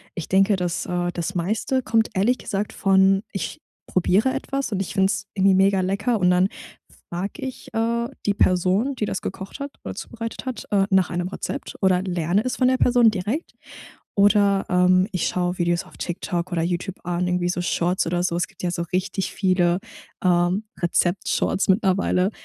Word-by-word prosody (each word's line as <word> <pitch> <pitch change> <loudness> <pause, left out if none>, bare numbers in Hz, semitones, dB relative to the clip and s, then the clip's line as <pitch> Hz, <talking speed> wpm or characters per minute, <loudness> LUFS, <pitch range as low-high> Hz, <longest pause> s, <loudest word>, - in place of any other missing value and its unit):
Ich 170 - -5
denke, 195 +2 +4
das 180 -2 -2
äh, 175 0 -1
das 175 +3 -4
meiste 220 +9 0
kommt 225 0 +2
ehrlich 230 +7 +2
gesagt 205 +1 -3
von 195 0 +4
ich 195 - -4 0.3
probiere 195 +8 +2
etwas 275 -1 -3
und 195 -2 -1
ich - - -4
find's 190 0 +1
irgendwie 195 -1 +4
mega 195 0 +4
lecker 205 +5 0
und 180 -1 +3
dann 180 +1 +4 0.6
frage 180 +4 -4
ich, 260 - -8
äh, 235 +1 0 0.2
die 205 - +2
Person, 190 +8 +2
die 220 - -1
das 195 - -3
gekocht 190 +6 -6
hat 280 0 -5
oder - - -6
zubereitet 230 +3 -6
hat, 255 -4 -5
äh, 195 -2 +3
nach 190 -1 +4
einem 175 0 -2
Rezept 190 - -5
oder 185 -1 +3
lerne 180 +1 0
es 255 - -1
von 255 -1 +3
der 260 - +2
Person 240 -3 +5
direkt 215 - -3 0.6
oder, 200 -1 +4
ähm, 180 +1 +4
ich 185 -3 0
schaue 180 0 -1
Videos 175 -1 +1
auf - - -17
TikTok 175 0 -3
oder 165 - +1
Youtube 180 +2 -2
an, 175 +1 -1
irgendwie 180 0 0
so 175 0 -1
Shorts 175 +1 0
oder 175 +1 0
so. 175 -1 0
Es 165 - 0
gibt - - -15
ja 175 - 0
so 170 - -3
richtig 185 +1 -1
viele, 185 -2 +2 0.4
ähm, 180 +2 +2 0.2
Rezeptshorts 175 +2 +1
mittlerweile, 190 -1 +2
190 Hz, 180 wpm, -23 LUFS, 180-205 Hz, 0.6 s, Person